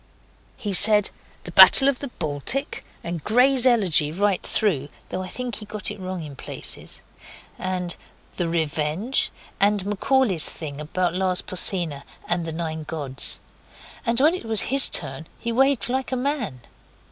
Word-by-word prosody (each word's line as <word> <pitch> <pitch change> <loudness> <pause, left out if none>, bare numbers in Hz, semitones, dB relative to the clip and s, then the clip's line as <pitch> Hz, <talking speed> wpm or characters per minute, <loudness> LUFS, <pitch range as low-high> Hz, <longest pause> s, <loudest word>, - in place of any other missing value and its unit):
He 205 -2 -4
said 210 +1 +7 0.3
'The - - -9
Battle 270 - +8
of 275 -3 +1
the 280 - -5
Baltic', 170 - -4 0.2
and 170 -3 -5
'Gray's 255 +3 +3
Elegy', 185 -11 +2
right 195 +2 0
through, 150 -10 0 0.2
though 185 - -4
I 185 - -6
think 245 +2 -5
he 215 - -8
got 210 -1 -5
wrong 185 -3 -6
in 145 -2 -9
places, - - -6 0.6
and 180 -2 -3 0.4
the 175 - -1
'Revenge', 160 - -1 0.3
and 200 -1 +2
Macaulay's 210 - +2
thing 150 -2 -8
about 175 +3 -2
Lars 185 0 -1
Porsena 175 -6 +1 0.2
and 175 -1 -2
the - - -4
Nine 160 -1 -5
Gods. 150 -4 -2 0.6
And 235 -1 +1
when 305 +5 +4
it 365 - -6
was 220 -2 +1
his 275 -1 +4
turn 140 0 -1
he 235 - -3
waved 265 -1 +1
like 260 +1 -3
a - - 0
man. 250 - -3
190 Hz, 155 wpm, -23 LUFS, 160-240 Hz, 0.6 s, Battle